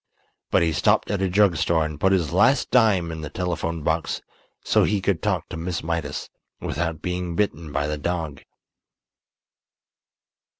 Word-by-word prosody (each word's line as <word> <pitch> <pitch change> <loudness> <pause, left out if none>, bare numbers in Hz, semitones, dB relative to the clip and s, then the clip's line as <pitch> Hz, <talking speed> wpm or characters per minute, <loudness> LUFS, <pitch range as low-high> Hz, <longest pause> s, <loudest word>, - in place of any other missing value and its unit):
But - - +3
he 80 - +2
stopped 75 - +2
at 100 -2 -1
a 95 - +1
drug 95 -2 +4
store 80 0 +2
and 75 -1 -6
put 95 +4 +3
his 85 -4 +1
last 105 +10 +3
dime 100 -9 +4
in 80 -1 -6
the 75 - -5
telephone 85 -3 -3
box 80 +1 0 0.4
so - - +3
he 105 0 +1
could 95 -3 0
talk - - -1
to - - -6
Miss 85 0 -3
Mydas 80 -3 -3 0.3
without 80 +1 -3
being 90 -1 -2
bitten 85 -5 -1
by 70 0 0
the 75 0 -3
dog. 80 -3 -3
85 Hz, 165 wpm, -24 LUFS, 80-90 Hz, 0.4 s, drug